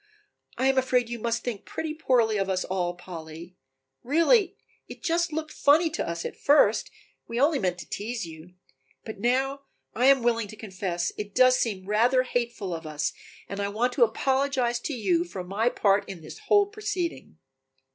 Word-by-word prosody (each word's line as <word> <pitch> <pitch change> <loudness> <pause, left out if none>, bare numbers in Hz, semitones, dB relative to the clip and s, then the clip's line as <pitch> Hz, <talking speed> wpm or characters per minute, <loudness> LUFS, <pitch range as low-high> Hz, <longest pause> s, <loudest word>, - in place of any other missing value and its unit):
"I 260 - 0
am 270 0 +4
afraid 250 -2 +1
you 240 - -4
must 235 +1 -1
think 230 -5 -4
pretty 315 -1 -4
poorly 240 -8 +2
of 195 -1 -1
us 185 -1 0
all, 180 -2 -2
Polly, 170 -1 -10 0.5
really 345 - +3 0.3
it - - -11
just 340 0 +1
looked 310 0 -4
funny 315 +3 +3
to 300 - -3
us 170 0 -4
at - - -5
first, 290 +1 +3 0.4
we 230 +1 -3
only 285 +1 +3
meant 180 -3 -1
to - - -12
tease 220 0 -4
you. 165 +2 -12 0.5
But 220 -3 -7
now, 265 +4 0 0.3
while 245 - -2
I - - +6
am 270 -3 +5
willing 230 -2 +1
to 215 - -10
confess, 190 -4 -3
it 205 -1 -6
does 255 0 +5
seem 195 -5 -2
rather 240 +5 +3
hateful 235 -7 -2
of 165 -1 -6
us 150 -1 -2 0.3
and 200 - -6
I 200 - 0
want 235 +5 0
to 250 - +4
apologize 260 +1 +1
to 290 - -4
you 190 -8 +1
for 180 +1 -7
my 205 +6 0
part 200 -3 +1
in 185 -4 -7
this 155 - -10
whole 410 -1 +5
proceeding." 375 - -4
235 Hz, 185 wpm, -26 LUFS, 190-270 Hz, 0.5 s, I